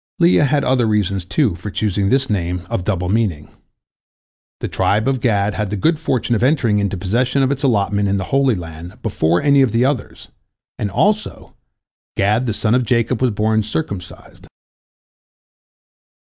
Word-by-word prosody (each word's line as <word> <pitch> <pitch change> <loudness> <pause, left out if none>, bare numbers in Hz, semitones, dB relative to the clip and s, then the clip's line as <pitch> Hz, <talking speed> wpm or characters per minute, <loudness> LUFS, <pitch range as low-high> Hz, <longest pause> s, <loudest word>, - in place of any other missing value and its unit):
Leah 170 -4 +4
had 145 0 +1
other 125 -3 +2
reasons, 100 -3 0
too, 130 - +1
for 90 +5 -7
choosing 100 -1 -1
this 135 +2 +2
name 90 -3 -2
of 90 - -1
double 90 -3 -1
meaning. 95 -7 -1 1.1
The - - -3
tribe 105 +4 0
of 135 -3 0
Gad 105 -4 +1
had 105 +1 -3
the 105 - -3
good 160 - +1
fortune 130 -7 -1
of 115 - 0
entering 125 -6 +2
into 100 -1 -1
possession 120 +8 0
of 135 - +1
its 140 0 -2
allotment 100 -6 +1
in 100 - +1
the 95 - -2
Holy 135 -3 +3
Land 85 0 -9
before 80 - 0
any 140 -1 +4
of 130 -5 +3
the 115 +3 +2
others, 130 -6 -3 0.5
and, 105 - -1
also, 210 - -1 0.6
Gad 105 +6 +1
the - - 0
son 110 +1 0
of 125 +1 +3
Jacob 120 0 0
was 130 - +3
born 110 0 +1
circumcised. 95 -2 -6
110 Hz, 170 wpm, -18 LUFS, 100-130 Hz, 1.1 s, Leah